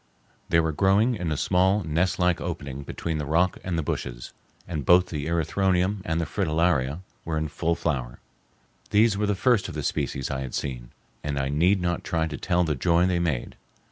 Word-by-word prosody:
They 85 - +4
were 80 -1 +1
growing 100 - +3
in 90 -7 -3
a 75 - -1
small, 95 +4 +2
nestlike 90 +2 +1
opening 70 -6 -5
between 80 +3 -4
the 75 - -2
rock 85 +4 +2
and 90 -2 -2
the 80 - 0
bushes, - - -4 0.3
and 80 -5 -3
both 90 +5 +5
the 75 -2 -4
erythronium 90 +4 +1
and 80 +1 0
the 85 - 0
fritillaria 80 -4 0 0.2
were 80 -1 -2
in 80 0 -1
full 85 +3 0
flower. 65 -8 -2 0.7
These 105 0 +4
were 105 +1 0
the 105 - +1
first 115 0 +2
of - - -7
the - - -3
species 70 -1 -2
I 65 0 -2
had 65 -2 -5
seen, 60 -3 -4 0.3
and 75 -1 -2
I 70 0 0
need 90 +7 +3
not 85 0 -1
try 80 -3 0
to 80 -2 -5
tell 90 -1 +1
the 80 -3 0
joy 85 +5 +2
they 90 -1 +1
made. 80 -8 -2
85 Hz, 200 wpm, -26 LUFS, 75-90 Hz, 0.7 s, both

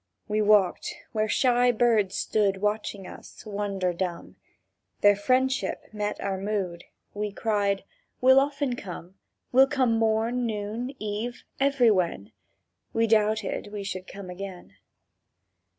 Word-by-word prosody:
We 215 0 +1
walked 210 -3 +3 0.2
where 215 -1 0
shy 245 +1 +3
birds 220 -5 +2
stood 200 -3 +1
Watching 210 -1 -2
us, - - -12
wonder 200 -3 -2
dumb; 175 -1 -4 0.7
Their 205 0 +6
friendship 255 +5 0
met 210 -1 -3
our 195 -1 -2
mood; 190 -4 -3 0.3
We 210 0 -3
cried: 200 -2 0 0.4
"We'll 260 +1 +7
often 280 -2 0
come: 180 -4 -8 0.4
We'll 265 +2 +6
come 265 -4 +1
morn, 225 +2 +1
noon, 220 +5 -4
eve, 215 +3 -4 0.2
everywhen!" 220 - +2 0.6
—We 225 0 +3
doubted 215 -2 +1
we 205 -1 -5
should 185 -2 -5
come 195 -2 -8
again. 185 - -8
210 Hz, 120 wpm, -27 LUFS, 195-240 Hz, 0.7 s, We'll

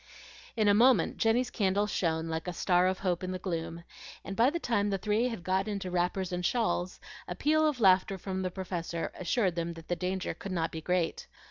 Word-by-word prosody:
In 215 -2 +2
a 205 - +6
moment 230 -4 +4
Jenny's 245 +3 +2
candle 200 -1 +1
shone 165 -5 -1
like 160 +1 -3
a 180 - -2
star 180 +1 +3
of 185 0 0
hope 180 -2 -1
in 185 - -3
the 185 - -2
gloom, 170 -2 -4 0.4
and 195 - -5
by 235 +4 +5
the 330 - -2
time 220 -9 0
the 195 - 0
three 210 +5 +1
had 225 -8 -5
got 190 +2 0
into 200 -3 -3
wrappers 180 +1 0
and 180 0 -2
shawls, 185 -4 0 0.3
a - - -4
peal 310 +1 +3
of 290 -5 -1
laughter 190 -1 +4
from 190 0 -4
the 185 - -1
Professor 175 -2 -4
assured 185 +1 0
them 170 0 -3
that 165 0 -12
the 175 - +1
danger 185 +1 -2
could 195 - -8
not 165 -2 -1
be 160 - -6
great. 180 0 -1
185 Hz, 220 wpm, -30 LUFS, 175-210 Hz, 0.4 s, a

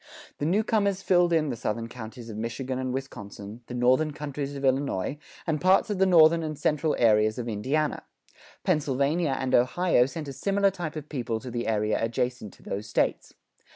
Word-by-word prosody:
The 145 - 0
newcomers 200 0 +1
filled 175 -2 +3
in 155 -3 +2
the 125 - -2
southern 115 0 -3
counties 115 0 -9
of 110 - -7
Michigan 125 +4 -4
and 130 -1 -2
Wisconsin, 110 -4 -7
the 125 - -6
northern 130 +5 +2
countries 145 -1 -5
of 140 0 -3
Illinois, 135 -2 0 0.3
and 155 -3 -1
parts 190 +3 +4
of 200 - -2
the 190 - +4
northern 165 -2 +6
and 155 -2 -4
central 150 +1 +1
areas 110 -2 +3
of 120 -1 -4
Indiana. 135 +8 -1 0.6
Pennsylvania 145 -2 +1
and 130 -1 -2
Ohio 125 +1 +3
sent 150 +1 -6
a 140 - -5
similar 200 +6 +1
type 175 -5 -5
of 150 -1 -6
people 120 -6 -3
to 125 +1 -8
the 120 0 -3
area 105 0 0
adjacent 120 -1 -2
to - - -20
those 100 +2 -5
States. 105 - -1
135 Hz, 185 wpm, -27 LUFS, 120-160 Hz, 0.6 s, northern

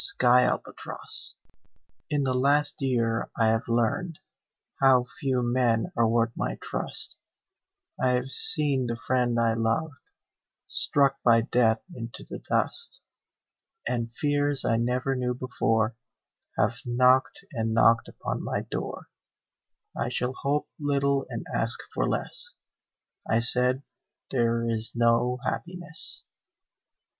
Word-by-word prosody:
Red 125 0 +4
Maples - - -1 0.7
In 145 -1 0
the 130 -1 0
last 140 +4 +2
year 115 -4 0
I 115 -1 +3
have 115 +2 0
learned 120 +9 0 0.6
How 130 -2 +5 0.2
few 130 -6 0
men 120 +3 +1
are 115 -1 +3
worth 115 0 +1
my - - -2
trust; - - -3 0.8
I 130 - +3
have 125 +1 -2
seen 140 -6 +3
the 115 0 -3
friend 125 -1 0
I 115 -1 +2
loved 115 +6 -1 0.7
Struck 140 -1 +1
by 115 -1 +5
death 115 -1 +1
into 115 -3 -7
the - - -7
dust, 475 +1 -2 0.9
And 115 -1 -2
fears 145 +1 0
I 115 - +2
never 125 +3 -1
knew 125 -1 -2
before 115 -3 0 0.6
Have 120 - +1
knocked 130 +8 +2
and 115 -2 -2
knocked 115 +1 +4
upon - - -5
my - - -2
door - - -6 0.9
"I - - -2
shall 125 +1 -2
hope 145 +2 -2
little 140 -1 0
and - - -6
ask - - +5
for - - 0
less," 485 0 -3 0.7
I 110 - +3
said, 125 +3 +4 0.5
"There 115 -2 +1
is 115 -1 -1
no 120 +1 +2
happiness." 175 -2 -3
125 Hz, 125 wpm, -26 LUFS, 115-135 Hz, 0.9 s, How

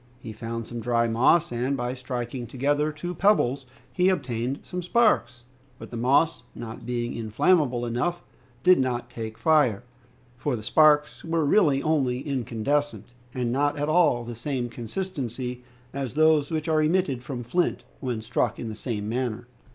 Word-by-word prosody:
He 115 -3 -8
found 115 +1 -5
some 120 +1 -6
dry 115 0 +1
moss, 130 +9 +3
and 125 +3 -1
by 125 0 -2
striking 125 -1 -5
together 145 +5 0
two 175 +4 -5
pebbles 140 -9 +2 0.3
he 180 0 +3
obtained 130 -6 -2
some 180 - -5
sparks, 180 - +2 0.3
but - - -11
the - - -6
moss, 135 +7 +2
not 115 0 -8
being 120 -1 -2
inflammable 120 - +1
enough, 125 +10 -2 0.4
did 185 -3 +6
not 120 -2 -1
take 110 -1 -6
fire, 145 -10 +3 0.5
for 125 +2 -1
the 110 - -7
sparks 150 +3 +4
were 165 -1 0
really 145 -4 +3
only 135 -6 +1
incandescent, 140 +2 -2 0.3
and 125 -2 -1
not 145 +3 +1
at 145 +1 -1
all 155 -7 +4
of 120 - -9
the 120 - -5
same 120 0 -3
consistency 125 - -5 0.3
as 135 -2 -4
those 155 -2 +4
which 155 0 -2
are 155 -1 +3
emitted 155 -5 +1
from 125 -2 -6
flint 170 +9 0 0.2
when 125 -4 -3
struck 115 0 0
in 115 - -5
the 110 - -6
same 105 -3 -4
manner. 120 0 -3
130 Hz, 165 wpm, -26 LUFS, 120-155 Hz, 0.5 s, did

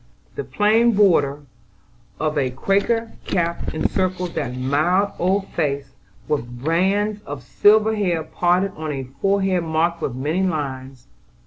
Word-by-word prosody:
The 430 - -4
plain 225 - +3
border 150 -8 +3 0.8
of 155 0 -1
a 135 -3 +1
Quaker 200 - 0
cap 170 -2 -1
encircled 180 +1 -1
that 125 -6 -3
mild 175 +10 +1
old 190 +2 +1
face, 140 -4 -2 0.4
with 120 -3 -3
bands 200 +5 +1
of 140 -3 -7
silver 215 - +4
hair 175 -6 0
parted 180 +4 +1
on 155 -1 -4
a 135 -2 -4 0.2
forehead 195 -2 +1
marked 165 +1 0
with 125 - -2
many 150 +8 -1
lines. 135 -7 -3
170 Hz, 130 wpm, -21 LUFS, 145-195 Hz, 0.8 s, silver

